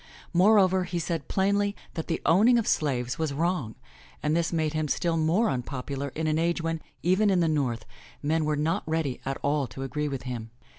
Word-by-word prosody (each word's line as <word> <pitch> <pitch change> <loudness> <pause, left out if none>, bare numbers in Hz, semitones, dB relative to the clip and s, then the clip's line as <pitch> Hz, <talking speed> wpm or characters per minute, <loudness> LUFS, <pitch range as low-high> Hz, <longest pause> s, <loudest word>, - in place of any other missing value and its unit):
Moreover, 190 0 +5
he 175 0 -3
said 165 -3 -2
plainly 200 +1 +1 0.2
that 160 - -4
the 165 - -2
owning 220 +9 +5
of 230 - +1
slaves 125 -2 0
was 160 -2 0
wrong, 165 -8 -1 0.5
and 150 +1 +1
this 170 -1 +1
made 160 -2 0
him 155 -1 -1
still 170 +3 0
more 165 +8 +2
unpopular 135 - -3
in 160 - -2
an 155 0 +1
age 170 +1 +1
when, 165 -1 -2 0.2
even 190 +4 +3
in 190 -2 +3
the 170 - +3
North, 130 -7 0 0.4
men 155 +2 +1
were 150 0 +1
not 155 +3 0
ready 155 -5 -1
at 135 0 -2
all 145 -1 +1
to 135 - -7
agree 150 +3 -2
with 135 -3 -4
him. 120 -3 -5
160 Hz, 200 wpm, -27 LUFS, 140-175 Hz, 0.5 s, Moreover